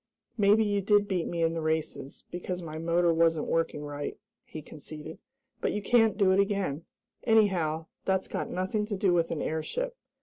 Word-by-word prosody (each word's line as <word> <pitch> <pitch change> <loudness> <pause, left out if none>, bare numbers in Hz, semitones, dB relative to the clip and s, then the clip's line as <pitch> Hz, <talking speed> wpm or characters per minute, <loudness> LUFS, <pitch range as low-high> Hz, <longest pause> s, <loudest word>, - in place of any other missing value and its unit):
"Maybe 210 0 +4
you 205 -1 +1
did 205 +1 +3
beat 180 -4 -1
me 170 -1 -1
in 165 0 +2
the 165 - -2
races, 155 -3 -2
because 180 0 -4
my 155 -1 -6
motor 170 +1 +2
wasn't 165 -1 +2
working 165 -2 -1
right," 145 0 -5 0.3
he 155 - -9
conceded, 155 +1 -9 0.4
"but - - 0
you 210 - -2
can't 225 -2 +4
do 195 -3 +4
it 190 - +4
again. 195 -7 0 0.4
Anyhow, 180 -8 +2 0.2
that's 190 0 0
got - - -3
nothing 185 +4 -1
to 205 -2 -3
do 190 -2 +3
with 170 -1 +2
an 155 - -2
airship. 475 - -2
175 Hz, 180 wpm, -29 LUFS, 160-205 Hz, 0.4 s, Maybe